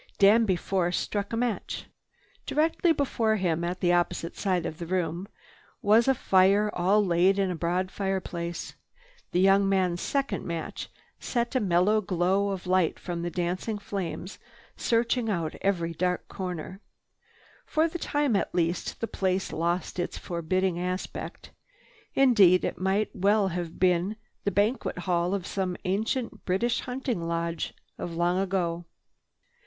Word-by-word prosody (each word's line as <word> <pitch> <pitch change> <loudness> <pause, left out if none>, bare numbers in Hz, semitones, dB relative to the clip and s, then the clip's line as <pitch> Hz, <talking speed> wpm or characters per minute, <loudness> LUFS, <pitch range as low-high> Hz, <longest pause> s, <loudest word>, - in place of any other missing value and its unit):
Danby 205 0 +5
Force 175 -1 0
struck 200 -1 -2
a 225 - -1
match. 235 -2 -2 0.6
Directly 325 +3 +2
before 235 -7 +1
him, 170 -4 0
at 175 +1 -3
the 175 -1 +3
opposite 175 -1 0
side 185 -4 0
of 160 - -5
the 170 - -5
room, 175 0 -1 0.6
was 220 +3 +5
a 270 - +4
fire 200 +1 +4
all 200 +4 +3
laid 180 +2 +3
in 195 -2 +1
a - - -2
broad 180 +3 -1
fireplace. 180 -4 -3 0.6
The 180 - +1
young 195 +1 +5
man's 185 -3 +1
second 275 0 -1
match 170 -1 -5 0.3
set 240 -1 -1
a 260 - +2
mellow 200 +2 +3
glow 190 +1 +1
of 190 -2 -4
light 180 -2 +2
from 175 -2 -5
the 175 - -2
dancing 180 +5 -2
flames 195 -2 -5 0.4
searching 235 0 +1
out 170 -6 -1
every 170 -4 0
dark 180 +2 -1
corner. 185 +1 -6 0.9
For 315 +1 +2
the 345 +1 -5
time 290 -7 +1
at 195 - -1
least, 170 0 -1
the 230 - 0
place 190 -2 -1
lost 170 +3 -1
its 175 - -2
forbidding 175 +1 -1
aspect. 180 +1 -5 0.6
Indeed 205 -9 +6
it - - -3
might 195 +3 0
well 200 +1 +3
have 170 -2 -5
been 180 +3 +2 0.3
the 200 - +2
banquet 210 +3 0
hall 175 +1 0
of 190 -3 -4
some 185 -3 -2
ancient 220 +6 -1
British 195 +6 +1
hunting 250 -6 -3
lodge, 170 0 -2 0.2
of 170 - -4
long 175 +2 +1
ago. 175 -3 -1
185 Hz, 150 wpm, -27 LUFS, 175-205 Hz, 0.9 s, Indeed